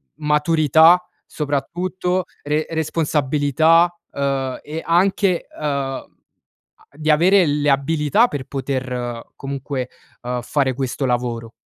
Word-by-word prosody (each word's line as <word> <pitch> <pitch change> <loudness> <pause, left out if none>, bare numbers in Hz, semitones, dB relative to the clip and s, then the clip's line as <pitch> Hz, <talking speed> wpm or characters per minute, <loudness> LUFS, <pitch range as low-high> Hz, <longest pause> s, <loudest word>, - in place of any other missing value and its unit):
maturità, 155 +3 +4 0.2
soprattutto, 180 +5 -2 0.2
re 150 +2 0
responsabilità, 160 +1 +2 0.2
uhm, 135 -2 -2
e 155 +2 -6
anche, 185 +1 +2
uhm, 140 -3 -2 0.9
di 155 +1 -3
avere 180 +5 +5
le 145 -1 +1
abilità 150 - +2
per 145 - -5
poter 125 -3 -4
comunque, 135 -1 -4 0.3
uhm, 125 0 -3
fare 130 +1 0
questo 135 +1 -3
lavoro. 120 -2 -2
145 Hz, 100 wpm, -20 LUFS, 135-165 Hz, 0.9 s, avere